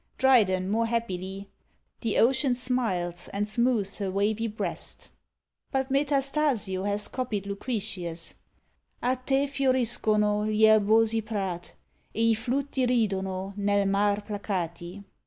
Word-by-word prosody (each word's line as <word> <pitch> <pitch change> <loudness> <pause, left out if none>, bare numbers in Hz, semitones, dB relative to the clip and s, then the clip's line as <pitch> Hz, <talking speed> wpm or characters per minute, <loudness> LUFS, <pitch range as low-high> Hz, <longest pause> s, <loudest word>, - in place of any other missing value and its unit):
Dryden 195 -8 +3
more 230 +2 +1
happily, 195 -4 -3 0.5
The 225 -3 0
ocean 260 +2 +3
SMILES, 190 -9 -2
and 205 +1 -1
smooths 215 -3 0
her 200 -2 -1
wavy 205 +4 0
breast. 215 0 -5 0.6
But 265 -1 -1
Metastasio 275 -8 +1
has 205 0 -1
copied 230 -6 -3
Lucretius: 200 -5 -3 0.7
A 250 +1 +2
te 270 +2 +1
fioriscono 230 -6 +1
Gli 215 0 +1
erbosi 220 +1 +4
prat: 195 -5 -4 0.4
E 230 +1 +3
i - - +5
flutti 255 +4 -1
RIDONO 195 -5 -1
Nel 200 0 +2
mar 200 +1 +2
placati. 190 -3 -4
215 Hz, 115 wpm, -27 LUFS, 195-245 Hz, 0.7 s, i